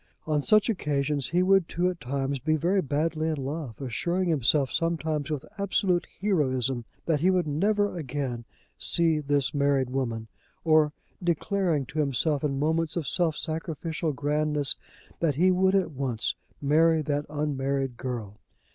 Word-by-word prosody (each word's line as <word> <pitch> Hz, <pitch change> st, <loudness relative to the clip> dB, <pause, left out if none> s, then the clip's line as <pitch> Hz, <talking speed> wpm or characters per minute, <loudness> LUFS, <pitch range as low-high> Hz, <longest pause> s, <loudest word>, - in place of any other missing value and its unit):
On 150 Hz, -2 st, +1 dB
such 215 Hz, +7 st, +4 dB
occasions 145 Hz, -, 0 dB
he 175 Hz, +2 st, +2 dB
would 190 Hz, -2 st, +3 dB
too, 175 Hz, +1 st, 0 dB
at 180 Hz, -2 st, -2 dB
times, 135 Hz, +2 st, -2 dB
be 155 Hz, +4 st, +1 dB
very 180 Hz, +6 st, +2 dB
badly 155 Hz, +1 st, -1 dB
in 160 Hz, -, 0 dB
love, 140 Hz, -3 st, -5 dB
assuring 170 Hz, +8 st, -1 dB
himself 140 Hz, -2 st, +2 dB
sometimes 160 Hz, -3 st, -1 dB
with 150 Hz, -4 st, -3 dB
absolute 190 Hz, -2 st, +1 dB
heroism 130 Hz, -, 0 dB, 0.2 s
that 160 Hz, -3 st, +1 dB
he 175 Hz, +5 st, +3 dB
would 180 Hz, -3 st, +2 dB
never 205 Hz, +8 st, +1 dB
again 135 Hz, -6 st, -3 dB, 0.4 s
see 165 Hz, -2 st, +3 dB
this 145 Hz, -2 st, 0 dB
married 140 Hz, -3 st, +1 dB
woman, 115 Hz, -4 st, -2 dB, 0.4 s
or 155 Hz, -2 st, +4 dB, 0.3 s
declaring 175 Hz, -3 st, 0 dB
to 155 Hz, +5 st, -5 dB
himself 145 Hz, +1 st, +1 dB
in 140 Hz, -2 st, 0 dB
moments 160 Hz, +2 st, 0 dB
of 165 Hz, -6 st, -2 dB
self 165 Hz, +1 st, +1 dB
sacrificial 160 Hz, 0 st, -3 dB
grandness 150 Hz, +1 st, +1 dB, 0.4 s
that 155 Hz, -5 st, +1 dB
he 180 Hz, +5 st, +4 dB
would 190 Hz, +1 st, +3 dB
at 190 Hz, -4 st, +1 dB
once 130 Hz, -5 st, -1 dB, 0.3 s
marry 160 Hz, +2 st, +3 dB
that 145 Hz, 0 st, -2 dB
unmarried 140 Hz, -3 st, -1 dB
girl. 115 Hz, -5 st, -5 dB
150 Hz, 150 wpm, -27 LUFS, 140-170 Hz, 0.4 s, such